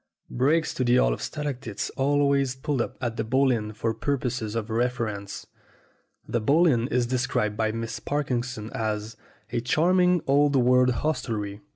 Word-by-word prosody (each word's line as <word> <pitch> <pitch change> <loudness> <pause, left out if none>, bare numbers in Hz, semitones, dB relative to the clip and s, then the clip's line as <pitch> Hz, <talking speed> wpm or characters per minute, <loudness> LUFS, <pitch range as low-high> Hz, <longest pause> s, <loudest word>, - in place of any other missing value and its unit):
Brakes 150 +6 +1
to 130 - -1
the 120 0 +3
Hall - - +3
of - - -6
Stalactites 130 -8 -4
always 140 -1 +1
pulled 130 0 -1
up - - -4
at 120 -2 -2
the - - 0
Bull 130 +4 +2
Inn 105 -3 -1
for 110 +1 -2
purposes 125 -3 -2
of 115 -1 -3
reference. 110 -4 -2 0.8
The 120 - -1
Bull 150 +10 +4
Inn 120 -7 +2
is 125 -3 +1
described 120 -4 -1
by 110 0 0
Miss 115 +1 -4
Parkinson 125 -6 -3
as 110 0 -3 0.4
"a 120 - -1
charming 180 +6 +3
old 145 +1 +3
world 125 0 +4
hostelry." 115 -7 -2
125 Hz, 160 wpm, -26 LUFS, 110-140 Hz, 0.8 s, Bull